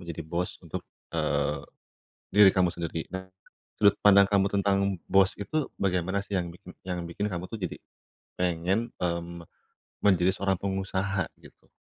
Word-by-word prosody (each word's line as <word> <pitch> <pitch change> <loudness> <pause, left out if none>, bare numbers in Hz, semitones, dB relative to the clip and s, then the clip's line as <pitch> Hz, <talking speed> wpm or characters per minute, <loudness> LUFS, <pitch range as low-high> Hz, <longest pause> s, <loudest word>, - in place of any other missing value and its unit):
menjadi 85 -2 -6
bos 85 +3 -3
untuk, - - -5 0.3
eee, - - 0 0.8
diri 105 -1 +9
kamu 90 -1 +3
sendiri. 85 -1 -3
Nah, 95 0 -4 0.6
sudut 100 -1 +6
pandang 100 -1 +7
kamu 100 -1 +4
tentang 100 0 +2 0.2
bos 95 0 +5
itu 150 +8 -1
bagaimana 95 0 0
sih 100 - -4
yang 85 - -3 0.4
yang 90 -1 -2
bikin 100 +5 -2
kamu 90 +1 -4
tuh 115 - -3
jadi 90 - -3 0.6
pengen, 90 +6 0
mmm, 85 -1 -3 0.6
menjadi 95 -2 +4
seorang 95 -1 +1
pengusaha, 95 -1 -1 0.2
gitu? - - -18
95 Hz, 140 wpm, -28 LUFS, 90-100 Hz, 0.8 s, diri